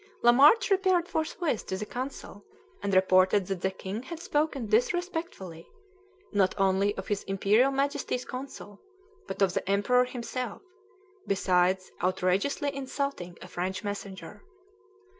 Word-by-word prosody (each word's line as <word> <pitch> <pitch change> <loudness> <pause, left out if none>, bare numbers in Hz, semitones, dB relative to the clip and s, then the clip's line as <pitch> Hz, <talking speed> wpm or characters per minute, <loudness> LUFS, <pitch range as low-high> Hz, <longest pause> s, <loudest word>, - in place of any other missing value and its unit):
Lamarche 290 - +6
repaired 375 -3 +3
forthwith 315 - -2
to 190 - -2
the 210 - -4
consul, 245 -4 -7 0.4
and 200 - -1
reported 185 +1 +4
that 190 -1 -4
the 190 - +1
king 190 +3 -6
had 315 +6 -8
spoken 300 -6 -1
disrespectfully, 240 - -1 0.6
not 195 -3 +2
only 195 +1 +2
of 190 - -6
his 205 -1 -1
Imperial 200 +6 +3
Majesty's 275 -2 -1
consul, 255 -6 -8 0.5
but - - -1
of 185 -2 +2
the - - -3
Emperor 250 +6 +3
himself, 250 - -5 0.6
besides 185 -1 +1
outrageously 190 +10 0
insulting 270 -10 -4
a - - -9
French 185 +2 -3
messenger. 200 -2 -6
205 Hz, 125 wpm, -28 LUFS, 190-275 Hz, 0.6 s, Lamarche